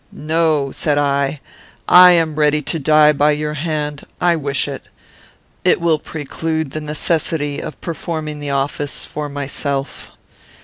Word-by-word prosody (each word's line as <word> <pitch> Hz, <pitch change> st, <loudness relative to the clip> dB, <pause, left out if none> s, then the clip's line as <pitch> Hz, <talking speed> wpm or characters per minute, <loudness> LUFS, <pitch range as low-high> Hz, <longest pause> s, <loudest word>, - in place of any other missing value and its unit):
"'No,' 155 Hz, -3 st, 0 dB
said 145 Hz, +1 st, -1 dB
I, 140 Hz, 0 st, 0 dB, 0.5 s
'I 180 Hz, 0 st, +9 dB
am 165 Hz, -2 st, +2 dB
ready 150 Hz, 0 st, +2 dB
to 165 Hz, -, -2 dB
die 150 Hz, +1 st, +5 dB
by 150 Hz, +1 st, +3 dB
your 150 Hz, 0 st, -3 dB
hand. 150 Hz, -1 st, -3 dB, 0.2 s
I 175 Hz, -1 st, +3 dB
wish 140 Hz, -3 st, -1 dB
it. 140 Hz, -1 st, -7 dB, 0.8 s
It -, -, +3 dB
will 165 Hz, -2 st, +2 dB
preclude 160 Hz, 0 st, -4 dB
the 155 Hz, -, -5 dB
necessity 150 Hz, -1 st, -1 dB
of -, -, -7 dB
performing 155 Hz, -3 st, -4 dB
the 145 Hz, -1 st, -5 dB
office 140 Hz, +1 st, -2 dB
for 150 Hz, 0 st, -5 dB
myself. 140 Hz, 0 st, -4 dB
150 Hz, 140 wpm, -18 LUFS, 145-160 Hz, 0.8 s, I